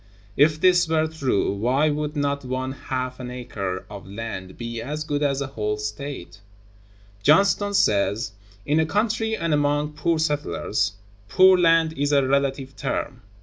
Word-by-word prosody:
If 150 +2 +4
this 180 0 +4
were 160 -1 +2
true, 140 -11 0
why 130 +9 +1
would 150 +1 -3
not 140 -1 -1
one 130 +1 -3
half 130 -1 -4
an 125 -1 -6
acre 100 -7 -5
of 100 -3 -10
land 100 -3 -6
be 115 -1 -5
as 150 +6 -4
good 145 -1 -2
as 140 -1 +1
a - - -1
whole 105 -5 -3
State? 105 -1 -6 0.8
Johnston(133) 200 +5 +4
says: 105 - +2 0.3
"In 150 +2 +2
a 160 - +2
country 220 +4 0
and 165 -2 -1
among 145 +1 +1
poor 165 +2 0
settlers... 145 - -1 0.4
poor 185 +4 +6
land 165 -2 +3
is 145 0 -1
a 140 -2 +3
relative 135 0 0
term. - - -3
140 Hz, 155 wpm, -23 LUFS, 120-155 Hz, 0.8 s, poor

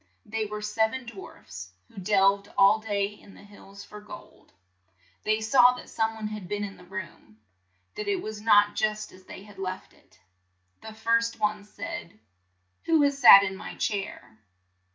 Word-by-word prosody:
They 220 0 -3
were 210 0 -6
sev 220 +1 0
en 260 -1 -6
dwarfs 95 - -11
who - - -24
delved 200 +1 +2
all 200 +2 +6
day 205 -2 -1
in 205 -1 -12
the - - -15
hills 200 -1 -14
for 210 0 -12
gold. 210 - -13 0.7
They 215 +1 0
saw 245 +2 +5
that - - -11
some 225 0 -1
one 215 -1 -5
had 210 -4 -7
been 205 +2 -3
in 195 -1 -6
the - - -15
room; 175 - -9 0.6
that 210 - -6
it 200 - +1
was 215 -1 -7
not 205 -1 +4
just 215 0 -2
as 185 0 -17
they 190 - -11
had 205 -2 -15
left 185 -1 -6
it. - - -27 0.6
The 220 -1 -10
first 230 +1 0
one 210 -1 -1
said, 210 - -8 0.7
"Who 320 -3 +4
has 280 -1 +1
sat 200 -6 +10
in 190 -1 -3
my - - -9
chair?" 195 - -4
210 Hz, 175 wpm, -27 LUFS, 195-220 Hz, 0.7 s, sat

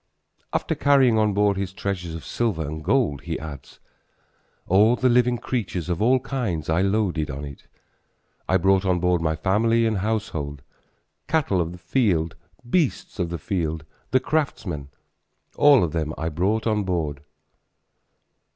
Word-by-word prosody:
After - - -1
carrying 130 -5 +4
on 105 -2 +2
board 100 -1 +2
his 95 -1 -3
treasures 90 -4 -4
of 80 - -8
silver 105 -10 -1
and 80 +1 -6
gold 100 - +1
he - - -4
adds: 75 -4 -9 0.9
All 105 +6 +4
the 130 +1 +2
living 125 0 +3
creatures 105 -8 -3
of 85 +1 -1
all 130 +4 +4
kinds 115 - -3
I 80 +3 +2
loaded 95 -6 0
on 70 +2 -5
it. 70 -1 -11 0.8
I 95 - +4
brought 95 +1 +3
on 90 -2 +1
board 90 -1 +1
my 80 -1 0
family 115 +7 +2
and 110 -3 0
household; 90 -10 -3 0.6
Cattle 135 - +1
of 85 0 -3
the 90 - -9
field, 90 -4 0 0.3
beasts 150 - 0
of 85 -2 0
the 85 - -3
field, 80 -6 -3 0.2
the 130 - +3
craftsmen, 115 - -2 0.7
All 145 -5 +6
of 85 - -1
them 80 -1 -2
I 80 - -2
brought 95 +8 0
on 105 -2 +1
board. 80 -7 -2
95 Hz, 155 wpm, -24 LUFS, 80-115 Hz, 0.9 s, All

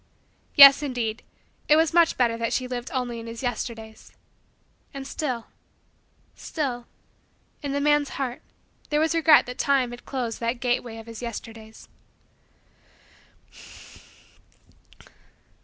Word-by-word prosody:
Yes, 280 -1 +10
indeed, 240 -6 -3 0.5
it 300 - +7
was 320 +1 +2
much 340 -1 +4
better 235 -2 +2
that 230 0 -2
she 255 - -1
lived 250 0 -5
only 245 -3 -3
in 230 - -9
his 230 +2 -8
Yesterdays. 225 -2 -5 0.8
And 270 -1 -6
still 255 -6 -4 0.9
still 250 -6 -4 0.7
in 285 -2 -4
the 285 - -1
man's 295 0 +1
heart 255 -3 -4 0.5
there 295 - +1
was 320 +2 +1
regret 320 -2 +5
that 250 0 -8
Time 270 -3 +1
had 240 - -10
closed 245 -4 -4
that 235 +1 -2
gateway 240 -2 -2
of 225 - -10
his 230 0 -10
Yesterdays. 225 -1 -9
250 Hz, 125 wpm, -25 LUFS, 230-280 Hz, 0.9 s, Yes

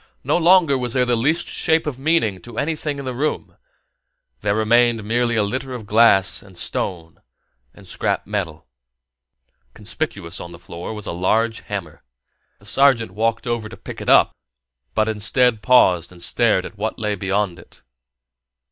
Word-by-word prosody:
No - - +1
longer 170 -5 +4
was 125 -2 -3
there 125 -1 +2
the 125 -1 +1
least 150 +9 0
shape 160 -1 0
of 140 -4 -4
meaning 135 - +1
to 120 -2 -11
anything 150 -1 -2
in 140 - -6
the 130 - -3
room; 150 +5 -3 0.8
there 100 0 0
remained 115 +1 +3
merely 120 +2 0
a 110 - +2
litter 130 +5 -3
of 120 -4 -7
glass 105 -3 +4
and 95 -3 -15
stone 85 -1 -4 0.5
and - - -16
scrap - - -2
metal. 90 -7 -4 1.1
Conspicuous 105 - -5
on 85 0 -8
the - - -10
floor 85 +1 -8
was 105 -2 -8
a - - -4
large 110 +6 0
hammer. 95 -7 -7 0.6
The - - -21
sergeant 130 -6 +3
walked 115 +3 -1
over 120 -3 -2
to - - -11
pick - - -9
it - - -3
up, - - +5 0.6
but, 110 0 +2
instead, 110 +2 +2
paused 90 -10 +4
and 90 - -14
stared 105 0 +2
at 105 - -11
what 110 +2 -2
lay 105 -1 -1
beyond 100 -2 -1
it. - - -18
110 Hz, 165 wpm, -21 LUFS, 100-125 Hz, 1.1 s, up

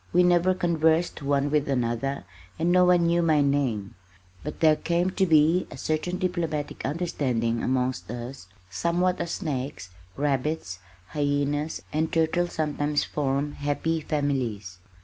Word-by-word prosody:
We 180 +1 +5
never 180 +1 +4
conversed 165 -2 +1
one 140 0 +1
with 150 -1 +1
another 125 +1 -1 0.3
and 170 +2 +1
no 180 0 +5
one 180 -1 +4
knew 170 +1 +3
my 155 -3 +3
name, 135 -8 0 0.5
but 150 - -6
there 155 -1 +5
came 175 +3 0
to 190 0 +1
be 160 +3 +4
a - - -9
certain 155 +3 -2
diplomatic 170 -5 -2
understanding 130 -7 -1
amongst 130 -2 -1
us 120 -1 -7 0.2
somewhat 175 - 0
as 170 - -3
snakes, 135 - -4 0.3
rabbits, 140 - -1 0.3
hyenas, 145 +1 -1
and 155 +1 0
turtles 165 +2 +1
sometimes 150 -1 0
form 140 0 -1
"happy 145 +3 -1
families." 125 -12 -2
150 Hz, 135 wpm, -26 LUFS, 135-170 Hz, 0.5 s, We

